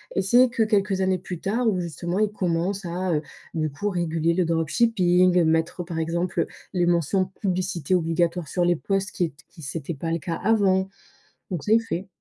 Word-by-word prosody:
et -, -, +2 dB
c'est 245 Hz, +6 st, +5 dB
que 235 Hz, -, -2 dB
quelques 200 Hz, -3 st, +1 dB
années 190 Hz, 0 st, +2 dB
plus 180 Hz, -2 st, -6 dB
tard 230 Hz, +7 st, 0 dB
où 195 Hz, -4 st, +2 dB
justement, 175 Hz, +2 st, -3 dB
ils 210 Hz, -1 st, +2 dB
commencent 185 Hz, +1 st, -1 dB
à, 180 Hz, +1 st, -1 dB
heu, 150 Hz, -, +1 dB, 0.3 s
du 155 Hz, -2 st, -1 dB
coup, 205 Hz, +9 st, -2 dB
réguler 170 Hz, -3 st, 0 dB
le 180 Hz, 0 st, +1 dB
dropshipping, 180 Hz, +1 st, +3 dB
mettre, 160 Hz, +2 st, +1 dB
par 170 Hz, -1 st, -6 dB
exemple, 170 Hz, +3 st, -1 dB
heu, -, -, -1 dB, 0.3 s
les 175 Hz, -1 st, +2 dB
mentions 175 Hz, +2 st, +2 dB, 0.2 s
«publicité 185 Hz, -4 st, 0 dB
obligatoire» 170 Hz, 0 st, 0 dB
sur 180 Hz, -, 0 dB
les 175 Hz, 0 st, +3 dB
post 195 Hz, +3 st, -1 dB
qui 175 Hz, -, 0 dB
ét 160 Hz, -, -7 dB, 0.2 s
qui 165 Hz, -, -15 dB
c'était 155 Hz, +3 st, -4 dB
pas 165 Hz, +4 st, -4 dB
le 165 Hz, -, 0 dB
cas 165 Hz, +3 st, -3 dB
avant, 195 Hz, -2 st, +2 dB, 0.6 s
donc 175 Hz, -5 st, -3 dB
c'est 220 Hz, +2 st, +5 dB
fait. 195 Hz, -4 st, -4 dB
180 Hz, 195 wpm, -24 LUFS, 165-195 Hz, 0.6 s, c'est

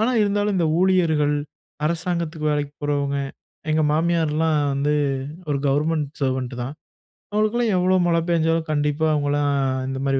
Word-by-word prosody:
ஆனா, 225 Hz, +3 st, +2 dB
இருந்தாலும் 205 Hz, 0 st, +1 dB
இந்த 170 Hz, -, +2 dB
ஊழியர்கள், 160 Hz, -6 st, +3 dB, 0.5 s
அரசாங்கத்துக்கு 170 Hz, -2 st, -2 dB
வேலைக்கு 145 Hz, -1 st, -2 dB
போறவங்க, 140 Hz, -1 st, 0 dB, 0.5 s
எங்க 155 Hz, 0 st, +2 dB
மாமியார்லாம் 160 Hz, -1 st, +1 dB, 0.2 s
வந்து 145 Hz, +2 st, +1 dB, 0.6 s
ஒரு 140 Hz, -1 st, 0 dB
கவர்மெண்ட் 150 Hz, +1 st, +1 dB
சர்வன்ட் 130 Hz, -1 st, -1 dB
தான். 135 Hz, +5 st, -5 dB, 0.6 s
அவுங்களுக்கெல்லாம், 215 Hz, +1 st, +1 dB
எவ்ளோ 185 Hz, +1 st, +3 dB
மழை 170 Hz, -1 st, +2 dB
பேஞ்சாலும், 165 Hz, -1 st, +1 dB
கண்டிப்பா 150 Hz, +1 st, +1 dB
அவுங்கல்லாம் 145 Hz, -1 st, +1 dB, 0.4 s
இந்த 135 Hz, 0 st, -4 dB
மாரி 135 Hz, 0 st, +2 dB
155 Hz, 130 wpm, -22 LUFS, 145-170 Hz, 0.6 s, ஊழியர்கள்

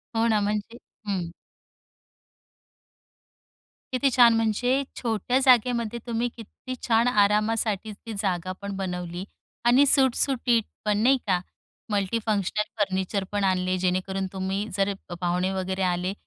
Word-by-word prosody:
हो, 225 Hz, +1 st, +2 dB
ना. 220 Hz, -2 st, +3 dB
म्हणजे 210 Hz, +3 st, -2 dB, 0.3 s
हं. 180 Hz, -4 st, -2 dB, 2.6 s
किती 255 Hz, +2 st, +2 dB
छान. 240 Hz, -1 st, +6 dB
म्हणजे 245 Hz, +5 st, +1 dB
छोट्या 230 Hz, +1 st, 0 dB
जागेमध्ये 240 Hz, -2 st, +3 dB
तुम्ही 235 Hz, +1 st, 0 dB
किती 230 Hz, +3 st, -9 dB
छान 230 Hz, 0 st, +3 dB
आरामासाठी 215 Hz, -1 st, +1 dB
ती 220 Hz, +2 st, -9 dB
जागापण 185 Hz, +1 st, -3 dB
बनवली 180 Hz, -2 st, -4 dB, 0.4 s
आणि 250 Hz, +4 st, +6 dB
सुटसुटीत 260 Hz, -3 st, +3 dB, 0.2 s
पण, 210 Hz, -1 st, +2 dB
नाही 265 Hz, +3 st, +5 dB
का. 185 Hz, -2 st, +2 dB, 0.5 s
मल्टीफंक्शनल 210 Hz, 0 st, 0 dB, 0.2 s
फर्निचर 195 Hz, 0 st, 0 dB
पण 205 Hz, -1 st, -1 dB
आणले, 185 Hz, -1 st, +1 dB
जेणेकरून 185 Hz, +1 st, -1 dB
तुम्ही, 190 Hz, +2 st, -2 dB
जर 200 Hz, 0 st, +1 dB, 0.3 s
पाहुणे 180 Hz, +1 st, 0 dB
वगैरे 190 Hz, 0 st, -3 dB
आले, 180 Hz, +1 st, 0 dB
205 Hz, 115 wpm, -25 LUFS, 190-230 Hz, 2.6 s, छान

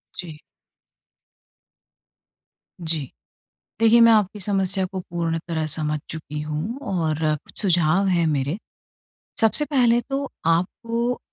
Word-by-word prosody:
जी। 165 Hz, -4 st, -7 dB, 2.4 s
जी। 160 Hz, -5 st, -2 dB, 0.7 s
देखिए, 230 Hz, +1 st, +6 dB
मैं 230 Hz, 0 st, +8 dB
आपकी 210 Hz, -1 st, +2 dB
समस्या 195 Hz, -1 st, 0 dB
को 190 Hz, -, -3 dB
पूर्ण 170 Hz, -2 st, -2 dB
तरह 160 Hz, -2 st, -1 dB
समझ 150 Hz, 0 st, -1 dB
चुकी 150 Hz, -1 st, -6 dB
हूँ 155 Hz, -, -3 dB, 0.2 s
और 160 Hz, -4 st, 0 dB, 0.3 s
कुछ -, -, -4 dB
सुझाव 180 Hz, 0 st, +3 dB
हैं 170 Hz, -3 st, +2 dB
मेरे 145 Hz, +1 st, 0 dB, 0.9 s
सबसे 225 Hz, +7 st, +3 dB
पहले 245 Hz, -5 st, +3 dB
तो 275 Hz, 0 st, -2 dB, 0.2 s
आपको 230 Hz, +9 st, 0 dB
180 Hz, 110 wpm, -23 LUFS, 160-225 Hz, 2.4 s, मैं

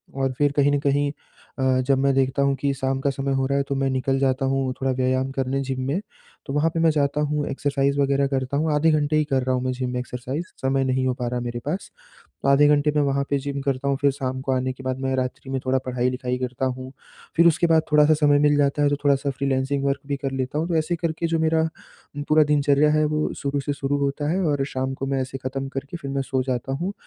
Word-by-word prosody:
और 135 Hz, -1 st, 0 dB
फिर 145 Hz, -1 st, +2 dB
कहीं 145 Hz, 0 st, +3 dB
न 145 Hz, -, +2 dB
कहीं 145 Hz, 0 st, +1 dB, 0.5 s
अ, 130 Hz, -1 st, +2 dB
जब 135 Hz, -, +4 dB
मैं 140 Hz, 0 st, +3 dB
देखता 135 Hz, +1 st, +1 dB
हूँ 140 Hz, 0 st, +2 dB
कि 140 Hz, +1 st, -1 dB
शाम 135 Hz, 0 st, -1 dB
का 140 Hz, -, 0 dB
समय 135 Hz, 0 st, -2 dB
हो 135 Hz, 0 st, +1 dB
रहा 140 Hz, +1 st, 0 dB
है 140 Hz, -, +2 dB
तो 140 Hz, -, 0 dB
मैं 135 Hz, 0 st, 0 dB
निकल 135 Hz, +1 st, 0 dB
जाता 135 Hz, 0 st, +1 dB
हूँ 135 Hz, -1 st, 0 dB
थोड़ा 135 Hz, -, +1 dB
व्यायाम 130 Hz, +1 st, 0 dB
करने 135 Hz, 0 st, -1 dB
जिम 130 Hz, -1 st, -3 dB
में। 155 Hz, +8 st, 0 dB, 0.5 s
तो 135 Hz, -, -5 dB
वहाँ 150 Hz, +2 st, +2 dB
पे 165 Hz, 0 st, -3 dB
मैं 165 Hz, 0 st, +4 dB
जाता 145 Hz, 0 st, 0 dB
हूँ 150 Hz, 0 st, -1 dB
एक्सरसाइज़ 140 Hz, 0 st, 0 dB
वग़ैरह 140 Hz, 0 st, +2 dB
करता 135 Hz, 0 st, -1 dB
हूँ 155 Hz, +1 st, +1 dB
आधे 160 Hz, +2 st, +3 dB
घंटे 155 Hz, 0 st, +1 dB
ही 155 Hz, -, +3 dB
कर 135 Hz, -3 st, 0 dB
रहा 130 Hz, 0 st, +1 dB
हूँ 125 Hz, -, -2 dB
मैं 130 Hz, -, 0 dB
जिम 125 Hz, 0 st, -3 dB
में 125 Hz, 0 st, -2 dB
एक्सरसाइज़ 125 Hz, +6 st, -5 dB, 0.2 s
समय 135 Hz, 0 st, +1 dB
नहीं 130 Hz, 0 st, 0 dB
हो 130 Hz, -, +1 dB
पा 125 Hz, -, -1 dB
रहा 125 Hz, 0 st, -2 dB
है -, -, -4 dB
मेरे 120 Hz, 0 st, -4 dB
पास। 180 Hz, +7 st, -3 dB, 0.5 s
तो -, -, 0 dB
आधे 140 Hz, +1 st, +6 dB
घंटे 150 Hz, 0 st, +3 dB
में -, -, +4 dB
वहाँ 140 Hz, 0 st, +1 dB
पे 140 Hz, -, +2 dB
जिम 140 Hz, 0 st, -4 dB
करता 140 Hz, 0 st, -1 dB
हूँ 140 Hz, -, +1 dB
फिर 140 Hz, -, +4 dB
शाम 130 Hz, -1 st, -4 dB
को 135 Hz, 0 st, -2 dB
आने 130 Hz, 0 st, 0 dB
के 130 Hz, +1 st, -13 dB
बाद 130 Hz, 0 st, -2 dB
मैं 130 Hz, 0 st, -1 dB
रात्रि 130 Hz, +1 st, -3 dB
में 135 Hz, -, 0 dB
थोड़ा 130 Hz, +1 st, +2 dB
पढ़ाई-लिखाई 125 Hz, 0 st, -1 dB
करता 125 Hz, +1 st, -2 dB
हूँ, 130 Hz, +1 st, -5 dB, 0.4 s
फिर 170 Hz, +1 st, +6 dB
उसके 170 Hz, +1 st, +4 dB
बाद 160 Hz, -1 st, +4 dB
थोड़ा-सा 150 Hz, +1 st, +5 dB
समय 145 Hz, -1 st, +4 dB
मिल 145 Hz, 0 st, +4 dB
जाता 145 Hz, 0 st, +2 dB
है 145 Hz, -, +4 dB
तो 145 Hz, -, +1 dB
थोड़ा-सा 140 Hz, 0 st, +2 dB
फ्रीलांसिंग 135 Hz, +1 st, -1 dB
वर्क 140 Hz, 0 st, 0 dB
भी 140 Hz, -, -1 dB
कर 135 Hz, 0 st, -3 dB
लेता 135 Hz, +3 st, -2 dB
हूँ। 165 Hz, +3 st, -1 dB
तो 170 Hz, -, -1 dB
ऐसे 165 Hz, +2 st, -1 dB
करके 165 Hz, 0 st, -2 dB
जो 165 Hz, 0 st, 0 dB
मेरा 160 Hz, 0 st, +2 dB, 0.6 s
पूरा 155 Hz, 0 st, +5 dB
दिनचर्या 145 Hz, +1 st, +3 dB
है 155 Hz, 0 st, +3 dB
वो 155 Hz, 0 st, 0 dB
शुरू 140 Hz, 0 st, -1 dB
से 145 Hz, +1 st, -2 dB
शुरू 140 Hz, 0 st, -1 dB
होता 140 Hz, +2 st, -1 dB
है 190 Hz, -, 0 dB
और 145 Hz, -2 st, 0 dB
शाम 130 Hz, +1 st, -1 dB
को -, -, 0 dB
मैं 135 Hz, -1 st, 0 dB
ऐसे 130 Hz, +1 st, -6 dB
ख़त्म 135 Hz, +1 st, -3 dB
करके 140 Hz, +5 st, -6 dB
फिर 140 Hz, -5 st, -7 dB
मैं 135 Hz, 0 st, -1 dB
सो 130 Hz, -1 st, -1 dB
जाता 130 Hz, 0 st, -3 dB
हूँ। 190 Hz, +3 st, -2 dB
140 Hz, 265 wpm, -23 LUFS, 130-145 Hz, 0.6 s, आधे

